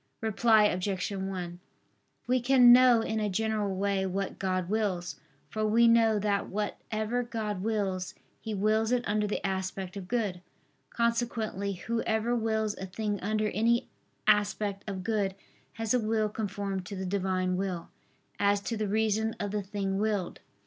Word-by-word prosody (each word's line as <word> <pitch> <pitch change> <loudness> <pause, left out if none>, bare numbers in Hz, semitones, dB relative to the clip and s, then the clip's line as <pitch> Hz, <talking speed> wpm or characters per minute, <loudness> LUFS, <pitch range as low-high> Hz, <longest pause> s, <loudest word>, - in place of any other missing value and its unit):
Reply 220 0 +4
Obj. 190 0 0
1: 190 -3 -4 0.7
We 250 0 +2
can 245 -1 +7
know 250 -2 +6
in 220 0 -2
a 210 -1 0
general 210 -1 -1
way 195 0 0
what 195 +1 -3
God 185 -2 -1
wills. 195 -4 -1 0.3
For 215 - -3
we 225 +2 +4
know 225 -2 +5
that 205 -1 0
whatever 215 +3 -2
God 220 -5 -3
wills, 195 -4 -2 0.2
He 220 -1 -4
wills 215 +3 +2
it 250 -1 +1
under 210 0 +1
the 205 - -3
aspect 190 0 -3
of 195 -2 -7
good. 205 -6 -1 0.5
Consequently 230 -4 -1
whoever 230 +3 -1
wills 220 -2 0
a 190 - -5
thing 205 +2 -3
under 215 +2 0
any 230 +4 +1 0.4
aspect 205 -1 +2
of 190 -2 -4
good, 200 -2 0 0.4
has 225 0 -1
a 250 - +4
will 215 -1 0
conformed 200 -2 -3
to 200 - -6
the 190 0 -4
Divine 185 -1 0
will, 185 -3 -3 0.5
as 200 0 +3
to 225 +2 -3
the 215 -1 -1
reason 220 +1 +1
of 205 -2 -2
the 210 0 -1
thing 195 -1 -2
willed. 205 -4 -1
210 Hz, 155 wpm, -29 LUFS, 195-220 Hz, 0.7 s, can